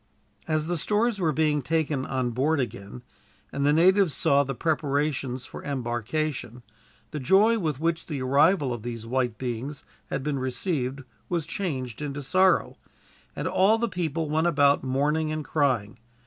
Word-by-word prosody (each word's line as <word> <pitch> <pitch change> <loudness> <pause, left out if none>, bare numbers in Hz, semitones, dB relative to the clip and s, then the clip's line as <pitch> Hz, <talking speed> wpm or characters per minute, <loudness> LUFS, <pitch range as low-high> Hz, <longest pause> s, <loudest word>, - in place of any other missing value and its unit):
As 155 -1 0
the 175 0 -2
stores 215 +5 +1
were 165 -4 +2
being 150 -1 +1
taken 150 -2 -1
on 130 -2 -1
board 140 +6 +1
again, 120 -1 -5 0.5
and 140 - -2
the - - +5
natives 180 +2 +4
saw 140 0 +3
the 135 -1 -4
preparations 140 -4 -1
for - - -9
embarkation, 125 0 -3 0.5
the 150 - -4
joy 200 - +4
with 155 -7 -2
which 165 +1 -1
the 150 -4 -3
arrival 140 +2 +3
of 120 - -6
these 115 -1 -6
white 120 -1 -1
beings 130 +4 -4 0.2
had 135 - -3
been 145 -1 -1
received 130 0 -2 0.3
was 170 -4 -1
changed 150 - -4
into 145 -1 -4
sorrow, 185 +6 +2 0.6
and - - -3
all 200 +4 +4
the 235 +1 0
people 165 -5 -2
went 160 +3 +1
about 145 -3 +3
mourning 150 +4 0
and 155 -1 -3
crying. 125 -8 0
145 Hz, 160 wpm, -26 LUFS, 130-165 Hz, 0.6 s, the